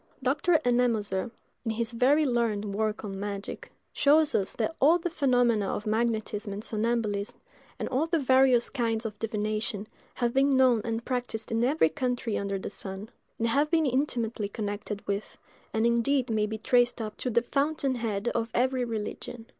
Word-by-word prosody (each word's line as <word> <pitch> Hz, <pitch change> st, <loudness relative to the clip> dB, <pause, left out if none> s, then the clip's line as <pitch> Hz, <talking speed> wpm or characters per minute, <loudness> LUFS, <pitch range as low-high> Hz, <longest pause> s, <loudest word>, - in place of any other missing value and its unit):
Dr. 290 Hz, +6 st, +3 dB
Ennemoser, 235 Hz, -4 st, +1 dB, 0.3 s
in 230 Hz, -, -2 dB
his 225 Hz, +1 st, -1 dB
very 270 Hz, +6 st, +3 dB
learned 220 Hz, -5 st, 0 dB
work 215 Hz, +1 st, -1 dB
on 195 Hz, -1 st, -5 dB
magic, 200 Hz, 0 st, -5 dB, 0.2 s
shows 305 Hz, +2 st, +4 dB
us 195 Hz, -, 0 dB
that 325 Hz, -, -1 dB
all 315 Hz, +6 st, +6 dB
the 350 Hz, 0 st, -3 dB
phenomena 245 Hz, -, +2 dB
of 205 Hz, -, -3 dB
magnetism 220 Hz, -1 st, -1 dB
and 205 Hz, +2 st, -6 dB
somnambulism, 220 Hz, -1 st, -1 dB, 0.4 s
and -, -, -3 dB
all 275 Hz, +5 st, +1 dB
the 335 Hz, 0 st, +1 dB
various 260 Hz, -3 st, +4 dB
kinds 230 Hz, -3 st, -1 dB
of 215 Hz, -2 st, -5 dB
divination, 215 Hz, -1 st, -2 dB, 0.3 s
have 240 Hz, -1 st, 0 dB
been 270 Hz, 0 st, +3 dB
known 255 Hz, -4 st, +4 dB
and 230 Hz, 0 st, -3 dB
practised 245 Hz, -4 st, -3 dB
in 225 Hz, +1 st, +1 dB
every 265 Hz, -, +3 dB
country 245 Hz, +4 st, -2 dB
under 200 Hz, 0 st, -2 dB
the 190 Hz, -, -6 dB
sun; 195 Hz, +2 st, -7 dB, 0.3 s
and 230 Hz, -, 0 dB
have 285 Hz, +6 st, +2 dB
been 325 Hz, -1 st, +3 dB
intimately 240 Hz, -6 st, -1 dB
connected 205 Hz, -1 st, -5 dB
with, 200 Hz, +1 st, -3 dB, 0.3 s
and 220 Hz, +1 st, +1 dB
indeed 235 Hz, +2 st, +2 dB
may 215 Hz, -1 st, +1 dB
be 220 Hz, +1 st, -4 dB
traced 245 Hz, +2 st, +2 dB
up 215 Hz, -2 st, -4 dB
to 255 Hz, -, -2 dB
the 235 Hz, 0 st, +2 dB
fountain 280 Hz, +1 st, 0 dB
head 225 Hz, -3 st, -2 dB
of 230 Hz, 0 st, -2 dB
every 255 Hz, +1 st, +2 dB
religion. 225 Hz, 0 st, -5 dB
235 Hz, 170 wpm, -28 LUFS, 215-255 Hz, 0.4 s, all